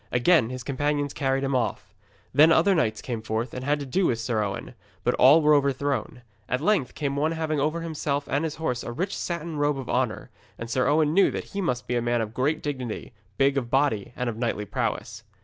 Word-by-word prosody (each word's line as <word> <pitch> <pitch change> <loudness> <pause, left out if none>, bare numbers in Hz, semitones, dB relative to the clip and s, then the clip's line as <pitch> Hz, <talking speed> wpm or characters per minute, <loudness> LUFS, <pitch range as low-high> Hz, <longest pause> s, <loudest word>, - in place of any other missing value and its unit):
Again 125 0 +4
his 130 -1 -6
companions 145 +2 -1
carried 135 -1 0
him 135 -1 0
off. 120 -3 -2 0.4
Then 155 +4 +7
other 170 +4 +5
knights 110 - 0
came 120 -3 -4
forth 110 +2 -3
and 125 - -5
had 145 +2 +1
to - - -4
do 175 +8 +1
with 115 - +1
Sir 115 -1 -1
Owen, 100 -1 -5 0.3
but - - +2
all 145 +5 +6
were 150 0 +5
overthrown. 140 -3 0 0.3
At 125 - 0
length 165 - +1
came 140 -2 -2
one 155 +3 +1
having 160 -2 -1
over 155 +4 0
himself 145 -3 -2
and 140 +3 0
his 160 -2 -2
horse 125 -7 -2
a - - -5
rich 185 +11 -3
satin 170 -2 -4
robe 145 -1 +1
of 130 -2 -6
honour, 125 -4 -1 0.3
and 115 0 -6
Sir 130 - +1
Owen 150 +1 +3
knew 195 +3 +5
that - - -4
he 200 - -2
must 125 -9 -1
be 125 - -2
a 120 - +1
man 120 0 +1
of 110 -1 -3
great 145 +6 0
dignity, 130 -4 -4 0.2
big 140 0 +3
of 120 -3 -7
body 135 -7 +1
and 125 - -2
of 115 -2 -3
knightly 115 -3 -2
prowess. - - -3
140 Hz, 225 wpm, -26 LUFS, 125-150 Hz, 0.4 s, Then